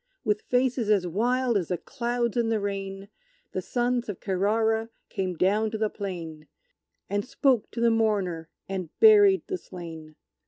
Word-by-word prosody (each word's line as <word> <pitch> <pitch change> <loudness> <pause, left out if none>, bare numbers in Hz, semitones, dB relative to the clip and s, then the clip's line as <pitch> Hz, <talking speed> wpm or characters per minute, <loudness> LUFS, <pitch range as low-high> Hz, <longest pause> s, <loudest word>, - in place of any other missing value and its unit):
With 210 -3 0
faces 250 -3 0
as 200 -4 +3
wild 240 +6 +1
as 175 - -4
the 180 - -1
clouds 240 0 -2
in 235 -2 +1
the 225 -1 +1
rain, 195 -1 -4 0.4
The - - -2
sons 245 -1 -1
of 200 - -5
Kerrara 220 +3 +1 0.2
came 185 -4 -2
down 210 +5 +2
to 220 - -4
the 215 -1 0
plain, 165 -6 -6 0.6
And 205 0 -1
spoke 255 -2 +1
to 230 - -5
the 235 0 +4
mourner 195 -8 0 0.2
and 185 -4 -4
buried 410 -3 +7
the 375 -1 -4
slain. 160 - -10
215 Hz, 160 wpm, -26 LUFS, 190-240 Hz, 0.6 s, buried